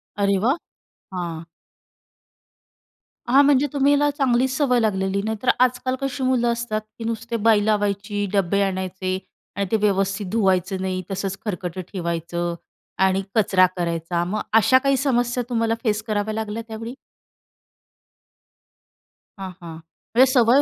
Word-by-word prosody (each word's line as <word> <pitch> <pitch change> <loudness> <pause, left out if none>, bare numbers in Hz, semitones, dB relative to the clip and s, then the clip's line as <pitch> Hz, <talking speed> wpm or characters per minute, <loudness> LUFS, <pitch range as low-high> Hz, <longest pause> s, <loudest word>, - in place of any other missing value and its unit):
अरे 200 -1 +2
वा! 270 +5 +3 0.6
हां. 170 -2 -4 1.8
हां. 275 +4 +6
म्हणजे 285 0 +4
तुम्हाला 285 +1 +3
चांगलीच 260 -1 +2
सवय 250 -5 +3
लागलेली, 195 -2 0
नाही 220 +2 -2
तर - - +2
आजकाल 255 +1 +2
कशी 275 -1 -3
मुलं 245 -2 +2
असतात, 235 -2 -2 0.2
की - - -5
नुसते 230 +1 -3
बाई 210 -2 +5
लावायची, 205 -1 0
डब्बे 200 0 +2
आणायचे 185 -1 -2 0.4
आणि 200 +1 -1
ते 220 - +3
व्यवस्थित 195 0 0
धुवायचं 190 -3 +1
नाही. 185 -1 -2
तसंच 195 0 -3
खरकटं 180 -3 -4
ठेवायचं 170 -1 -3 0.5
आणि 190 0 +2
कचरा 195 -4 +4
करायचा. 170 0 -1
मग 210 +4 -2
अशा 225 +4 +6
काही 275 +1 +2
समस्या 245 -2 +1
तुम्हाला 230 -1 +1
फेस 215 -3 +1
कराव्या 215 0 -1
लागल्या 220 0 -3
त्यावेळी? 225 +2 -6 2.5
हां, 190 -1 -5
हां. 165 -2 -8 0.4
म्हणजे 255 - +7
सवय 250 +2 +5
210 Hz, 130 wpm, -22 LUFS, 190-240 Hz, 2.5 s, म्हणजे